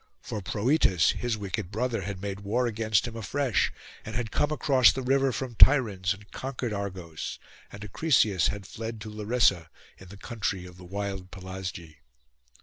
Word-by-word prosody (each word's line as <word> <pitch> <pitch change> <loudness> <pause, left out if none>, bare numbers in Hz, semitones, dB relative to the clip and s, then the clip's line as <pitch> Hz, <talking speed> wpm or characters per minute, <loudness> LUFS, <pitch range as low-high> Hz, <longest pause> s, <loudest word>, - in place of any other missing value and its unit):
For 105 - -5
Proetus 100 - +3
his 120 -2 -2
wicked 100 -2 -4
brother 115 +1 -1
had 100 0 -5
made 100 -1 -3
war 110 +5 0
against 110 -1 +1
him 115 - -7
afresh; 125 +3 0 0.3
and 110 - -7
had 115 -2 -2
come 150 - +1
across 135 -4 +5
the 130 - -4
river 135 +1 +3
from 125 0 -4
Tiryns, 105 -8 +5
and 105 +1 -18
conquered 130 -4 -4
Argos, 95 -6 -5 0.3
and 100 - -9
Acrisius 105 - +3
had 100 -1 -4
fled 115 +2 -6
to 110 -1 -7
Larissa, 105 -6 +2 0.3
in 95 - -12
the 100 +3 -11
country 100 -4 -3
of 90 0 -12
the 90 - -12
wild 95 0 -4
Pelasgi. 90 -4 -7
105 Hz, 165 wpm, -28 LUFS, 95-120 Hz, 0.3 s, across